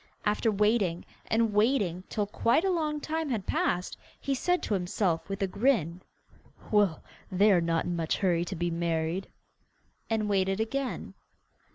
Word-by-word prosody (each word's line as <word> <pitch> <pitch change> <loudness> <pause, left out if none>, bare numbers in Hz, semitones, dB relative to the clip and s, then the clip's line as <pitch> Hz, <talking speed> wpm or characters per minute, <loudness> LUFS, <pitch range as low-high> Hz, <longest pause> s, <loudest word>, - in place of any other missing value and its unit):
After 210 +2 +2
waiting 210 -4 +1 0.2
and 225 -1 +2
waiting 205 -5 +2
till 210 -2 -1
quite 230 - +2
a 385 - +2
long 305 -4 -1
time 315 0 -2
had 220 -7 -2
passed, 180 +1 -1 0.2
he 275 - -1
said 355 +7 0
to - - -1
himself, 180 -2 0
with 195 +1 -2
a - - +1
grin, 185 - +1 0.7
'Well, 205 -7 +2 0.3
they 200 +3 +4
are 180 -3 +4
not 165 0 0
in 175 - -2
much 165 -1 -1
hurry 175 -4 +2
to 185 - -5
be 175 0 -1
married,' 165 +2 -1 0.8
and 220 -2 0
waited 195 -1 +1
again. 260 +4 -3
200 Hz, 160 wpm, -29 LUFS, 175-230 Hz, 0.8 s, they